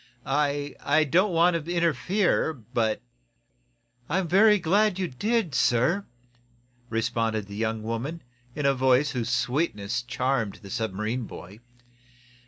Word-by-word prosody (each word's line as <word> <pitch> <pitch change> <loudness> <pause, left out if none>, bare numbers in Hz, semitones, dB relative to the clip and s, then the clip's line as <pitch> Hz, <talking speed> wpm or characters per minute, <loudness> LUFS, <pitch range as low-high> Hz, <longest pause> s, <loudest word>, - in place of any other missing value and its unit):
"I 145 +1 0
I 155 +2 +3
don't 180 +7 +2
want 170 -1 +3
to 170 - -6
interfere, 175 +1 +1
but 110 -2 -2 0.5
" 120 0 -40
"I'm 180 +3 0
very 210 +5 +5
glad 200 +3 +2
you 185 -1 -1
did, 205 - -1
sir," 130 +11 +2 0.8
responded 115 -1 -1
the 100 0 -10
young 110 0 -2
woman, 120 +9 -4 0.3
in 145 -1 -2
a 140 - +4
voice 130 +1 +3
whose 120 -3 -3
sweetness 125 -4 -1
charmed 125 -3 -1
the 100 - -10
submarine 110 +3 -2
boy. 95 +5 -11
130 Hz, 130 wpm, -26 LUFS, 115-170 Hz, 0.8 s, very